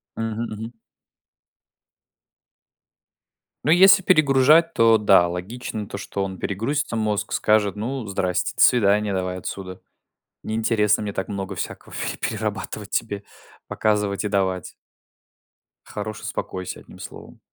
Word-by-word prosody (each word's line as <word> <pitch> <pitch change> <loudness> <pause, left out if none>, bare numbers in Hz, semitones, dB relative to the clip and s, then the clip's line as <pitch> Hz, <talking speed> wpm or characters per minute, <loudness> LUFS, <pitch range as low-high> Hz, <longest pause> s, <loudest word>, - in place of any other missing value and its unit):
Мгм. 115 0 -3
Мгм. 110 +2 -8 2.9
Ну, 155 - +3
если 190 +3 +7
перегружать, 155 0 +5
то 115 -1 +5
да, 100 -4 +5
логично 105 +5 -5
то, 100 - -6
что 100 -1 -4
он 95 -1 -5
перегрузится 115 +6 -2
мозг, 105 -1 -1
скажет: 105 -2 +2
ну, 115 +2 -4
здрасте, 95 -2 -1
до - - -1
свидания 105 -3 +4
давай 90 -1 -2
отсюда. 95 0 -7 0.6
Не 110 - -4
интересно 110 -2 +2
мне 105 -1 -3
так 95 - -3
много 100 -1 -4
всякого - - -6 0.2
и - - -9
перерабатывать 105 -1 -4
тебе. 100 -3 -2 0.4
Показывать 105 -1 0
и - - 0
давать. 95 -3 -1 1.1
Хорош 105 +1 -6
успокойся 95 -1 -5
одним - - -15
словом. - - -11
105 Hz, 125 wpm, -23 LUFS, 100-115 Hz, 2.9 s, если